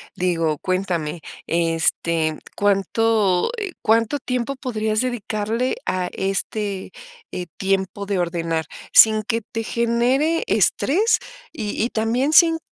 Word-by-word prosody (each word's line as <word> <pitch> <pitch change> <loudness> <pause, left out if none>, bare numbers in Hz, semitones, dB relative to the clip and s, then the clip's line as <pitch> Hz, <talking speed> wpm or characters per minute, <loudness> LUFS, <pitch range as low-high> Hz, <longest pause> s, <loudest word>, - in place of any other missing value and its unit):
Digo, 165 -4 0
cuéntame, 175 -4 -2 0.3
este, 165 -1 +1 0.2
¿cuánto, 205 - +2
eh, 405 -4 -4
cuánto 230 +5 +2
tiempo 250 +2 -2
podrías 220 -4 -1
dedicarle 230 0 -2
a 185 -1 0
este, 195 0 -3 0.4
eh, 180 -1 -5
tiempo 195 +1 -1
de 195 -2 -1
ordenar, 165 -2 -1 0.3
sin 215 -1 +7
que 230 +1 -1
te 225 +1 -5
genere 245 +8 +1
estrés, 405 +11 +2 0.3
y 215 -9 -4
y, 235 - 0
también 240 +7 0
sin 325 0 +6
215 Hz, 115 wpm, -21 LUFS, 180-235 Hz, 0.4 s, sin